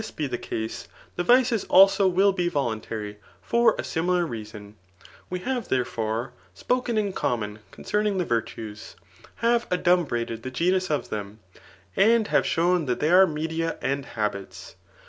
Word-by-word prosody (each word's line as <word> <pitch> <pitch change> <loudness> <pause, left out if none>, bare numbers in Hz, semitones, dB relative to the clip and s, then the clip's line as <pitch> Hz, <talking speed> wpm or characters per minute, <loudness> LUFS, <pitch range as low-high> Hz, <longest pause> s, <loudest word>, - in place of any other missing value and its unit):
be 155 - -2
the 130 -3 -3
case, 110 -2 -5 0.3
the 175 - -1
vices 245 -1 +3
also 195 +1 +6
will 190 +2 +4
be 180 -2 -1
i^taA 120 -8 -1
tary,* 105 -2 -6 0.2
foi: 235 0 +3
a - - -3
similar 175 +1 0
reason.. 105 -5 -8 0.5
Wo 180 - -2
hare, 250 +7 -2
therefiore, 120 - -2 0.3
^pokm 235 -5 -1
isLConunon 105 - -2
concealing* 210 -1 -1
the 180 - 0
virtue^ 110 -3 -4 0.4
have 235 0 +1
adumbntfedr.thn 170 -11 0
ffnut 180 +9 0
of 150 -2 -2
them, 105 0 -5 0.6
and 220 +1 +4
have - - +2
showa 175 +1 +2
that 125 - -1
they 155 - +1
are 190 +1 +7
media 160 +1 -3
wtA 140 +1 -2
faal&ts 105 -6 -5
165 Hz, 145 wpm, -25 LUFS, 115-190 Hz, 0.6 s, are